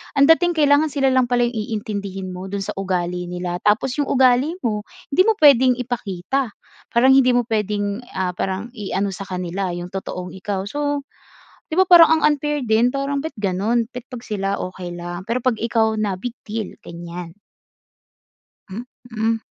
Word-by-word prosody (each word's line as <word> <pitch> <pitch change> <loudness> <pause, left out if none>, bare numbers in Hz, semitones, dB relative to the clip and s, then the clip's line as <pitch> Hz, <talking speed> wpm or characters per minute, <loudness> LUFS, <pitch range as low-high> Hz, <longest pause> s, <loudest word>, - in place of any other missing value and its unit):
ang 275 - +5
dating 345 +1 +5
kailangan 295 0 +4
sila 270 -2 +2
lang 255 -1 +3
pala 245 0 +2
yung 235 - -6 0.3
iintindihin 195 -3 -5
mo 185 +1 -7
do'n 200 -1 -2
sa - - -4
ugali 180 -2 -2
nila. 180 0 -4
Tapos 230 +5 +2
yung 285 - +1
ugali 260 +5 +3
mo, 210 -3 -1 0.3
hindi 350 - +4
mo 445 - +4
puwedeng 260 -4 +6
ipakita. 240 +1 -2 0.4
Parang 255 +3 +5
hindi 255 -2 +5
mo 245 - +3
puwedeng, 205 -1 -1 0.2
ah, 185 -1 0
parang 190 +4 -3
iano 200 -2 -2
sa 195 - -6
kanila 185 +1 -3
yung 175 0 -6
totoong 180 -2 -5
ikaw. 190 +1 -3
So, 290 +3 -2 0.7
'di 315 - -2
ba, 375 - +7
parang 340 -3 +9
ang - - -8
unfair 295 0 -2
din 220 +2 +4
parang, 275 0 -1
ba’t 320 - -5
gano'n? 210 +4 0
Ba’t 250 0 -8
'pag 245 -3 -7
sila, 200 -2 -1
okey 180 -1 -6
lang, 175 +1 -6
pero 235 +2 +1
'pag 255 -3 +2
ikaw 225 -1 +2
na, 200 -3 -1
big 240 +3 -5
deal, 215 -1 -4
ganiyan. 170 +1 -8 1.3
Mm. 225 +1 -3
220 Hz, 170 wpm, -21 LUFS, 190-260 Hz, 1.3 s, parang